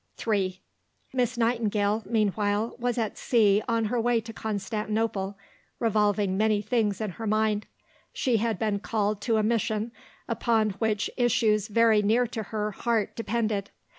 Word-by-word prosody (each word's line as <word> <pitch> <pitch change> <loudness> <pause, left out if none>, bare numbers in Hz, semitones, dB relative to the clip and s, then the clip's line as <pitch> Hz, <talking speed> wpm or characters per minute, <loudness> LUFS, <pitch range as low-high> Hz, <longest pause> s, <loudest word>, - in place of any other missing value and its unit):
III 190 -4 0 0.5
Miss 250 -1 0
Nightingale, 220 -3 +1
meanwhile, 210 0 0
was 245 0 -1
at 220 -3 -2
sea 210 -4 +3
on 230 -1 +1
her 235 +2 0
way 240 0 +2
to 225 0 -9
Constantinople, 210 -1 -2 0.4
revolving 210 -3 +2
many 215 0 +3
things 210 -2 0
in 215 -3 -2
her 225 +5 -6
mind. 215 0 +1 0.4
She 245 -3 +1
had 220 -1 0
been 210 -1 0
called 210 -1 -1
to 225 0 +1
a 215 - +2
mission 220 0 0 0.4
upon 220 -3 +1
which 215 -2 0
issues 225 -4 +2
very 225 -1 +4
near 225 +4 +3
to 225 -1 -4
her 210 0 -3
heart 225 0 -1
depended. 220 -3 -1
215 Hz, 145 wpm, -27 LUFS, 210-230 Hz, 0.5 s, very